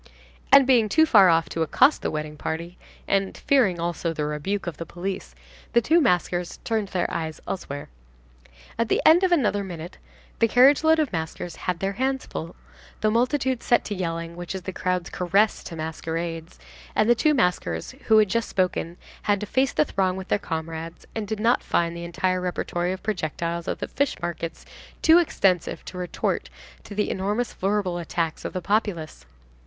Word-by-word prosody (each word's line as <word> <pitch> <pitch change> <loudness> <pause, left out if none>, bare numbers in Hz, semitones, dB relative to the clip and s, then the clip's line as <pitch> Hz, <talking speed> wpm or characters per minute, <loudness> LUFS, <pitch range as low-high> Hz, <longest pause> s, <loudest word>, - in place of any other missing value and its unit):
And, 275 0 +8
being 240 -5 +4
too 315 +8 +5
far 200 - +7
off 165 0 +3
to 165 - -3
accost 260 - +4
the - - -1
wedding 150 0 -4
party, 170 +3 -4 0.3
and 195 -1 0
fearing 215 -11 +2
also, 170 0 -2
the 150 -2 -2
rebuke 150 +7 -2
of 175 -4 -5
the 165 - -5
police, 185 +4 -5 0.4
the 235 - +6
two 330 +8 +4
maskers 180 - 0
turned 220 -3 -1
their 185 -2 -1
eyes 160 -1 -3
elsewhere. 145 -6 -5 0.9
At 230 -1 +1
the - - +2
end 335 +4 +7
of 370 - +3
another 210 -11 +2
minute, 175 -3 -8 0.4
the 230 - +5
carriage 260 +6 +5
load 320 0 +5
of 300 -8 0
maskers 160 +1 -4
had 180 -2 -3
their 195 0 0
hands 265 +4 -1
full, 165 +2 -6 0.5
the 215 - +2
multitude 255 +2 +1
set 240 - +2
to 205 - -3
yelling, 170 -2 -4
which 175 +2 -6
is 190 - -6
the 190 - -5
crowd's 180 -1 -2
caress 195 +4 +1
to 170 - -7
masquerades; 165 +1 -4 0.4
and 215 - +3
the 240 - +7
two 300 +5 +2
maskers 175 - 0 0.2
who 220 - +6
had 215 -1 +5
just 230 +4 -1
spoken 180 -3 -1 0.2
had 205 -1 +1
to 210 - -4
face 260 +5 +1
the 305 - +2
throng 190 -6 0
with 190 0 -7
their - - +2
comrades, 165 -1 -5
and 220 -2 -4
did 215 0 -3
not 235 +3 +3
find 170 0 0
the 170 - -6
entire 185 +1 -1
repertory 175 0 -2
of 185 - -6
projectiles 170 -3 -3
of - - -1
the - - -4
fishmarkets 175 - -3 0.4
too 325 +1 +7
extensive 190 - +1
to - - -9
retort 180 -1 -2 0.3
to 205 - -10
the 210 - 0
enormous 205 +5 -1
verbal 190 -2 -1
attacks 165 -1 -2
of - - -5
the 185 - -3
populace. 175 - -2
185 Hz, 185 wpm, -24 LUFS, 170-225 Hz, 0.9 s, And